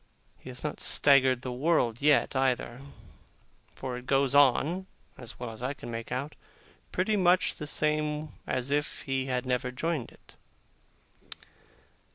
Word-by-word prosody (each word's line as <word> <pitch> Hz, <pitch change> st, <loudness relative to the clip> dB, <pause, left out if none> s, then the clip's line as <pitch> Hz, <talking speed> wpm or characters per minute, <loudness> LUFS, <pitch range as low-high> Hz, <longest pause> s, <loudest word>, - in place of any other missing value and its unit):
He -, -, -11 dB
has 125 Hz, -1 st, -6 dB
not 150 Hz, -, -3 dB
staggered 130 Hz, -3 st, +4 dB
the 125 Hz, -, -4 dB
world 125 Hz, -3 st, +1 dB
yet, 145 Hz, -1 st, +3 dB
either; 130 Hz, -1 st, 0 dB, 0.9 s
for 130 Hz, -2 st, -5 dB
it 125 Hz, 0 st, -11 dB
goes 135 Hz, 0 st, +2 dB
on 145 Hz, +7 st, +3 dB, 0.3 s
(as 120 Hz, -2 st, -9 dB
well 120 Hz, -2 st, -5 dB
as 110 Hz, +1 st, -11 dB
I 135 Hz, +3 st, -2 dB
can 120 Hz, -, -8 dB
make 115 Hz, 0 st, -6 dB
out) 140 Hz, +4 st, -3 dB, 0.6 s
pretty 210 Hz, +4 st, +1 dB
much 185 Hz, -2 st, +3 dB
the 150 Hz, -, -7 dB
same 150 Hz, 0 st, 0 dB, 0.2 s
as 130 Hz, +2 st, -1 dB
if 145 Hz, +1 st, -1 dB
he 135 Hz, -1 st, -2 dB
had 125 Hz, -1 st, -1 dB
never 125 Hz, 0 st, -1 dB
joined 140 Hz, +1 st, -3 dB
it. -, -, -20 dB
135 Hz, 150 wpm, -29 LUFS, 125-150 Hz, 0.9 s, staggered